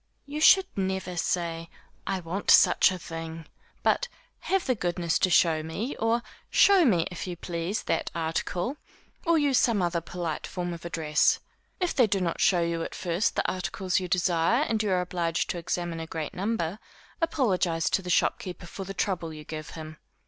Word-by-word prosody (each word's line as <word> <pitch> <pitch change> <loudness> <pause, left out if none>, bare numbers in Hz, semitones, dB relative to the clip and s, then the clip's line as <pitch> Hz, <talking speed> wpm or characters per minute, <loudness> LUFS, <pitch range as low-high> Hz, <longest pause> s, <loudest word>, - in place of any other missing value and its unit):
You 295 +2 -5
should 380 +4 +7
never 190 -2 -2
say, 165 -1 -2 0.4
I 190 -1 -1
want 175 +4 -4
such - - +6
a 185 - -4
thing, 165 -1 -7 0.4
but, - - +2 0.3
have 385 -1 0
the 255 - +2
goodness 175 -5 -1
to 185 - +3
show 165 -2 +4
me, 195 - -4
or 230 +1 +1 0.3
show 390 -2 +6
me, 180 -10 +3
if 180 +1 -6
you 175 -1 -5
please, 170 +4 -3
that - - -1
article, 175 - -2 0.5
or 335 -1 +5
use 285 -4 +3
some 230 -4 +2
other 175 -2 0
polite 170 -2 -4
form 175 -1 -4
of 170 0 -9
address. 155 -3 +2 0.4
If 360 -2 0
they 250 -5 +4
do 195 -1 +1
not 170 -3 -2
show 180 -3 +4
you 170 0 -1
at - - -5
first 175 +4 0
the - - 0
articles 185 0 -1
you 185 - -4
desire, 180 - +2
and 225 -7 0
you 210 - -1
are 185 -1 +2
obliged 170 -2 -1
to 175 - -4
examine 170 0 -3
a 160 - -5
great 160 -2 -5
number, 195 -2 -2 0.4
apologize 190 - +1
to - - +2
the 180 - -7
shopkeeper 180 +1 0
for 190 +3 -7
the 195 +1 -7
trouble 180 -4 -1
you 155 -1 -9
give 155 0 -7
him. 155 -1 -8
180 Hz, 185 wpm, -27 LUFS, 165-205 Hz, 0.5 s, should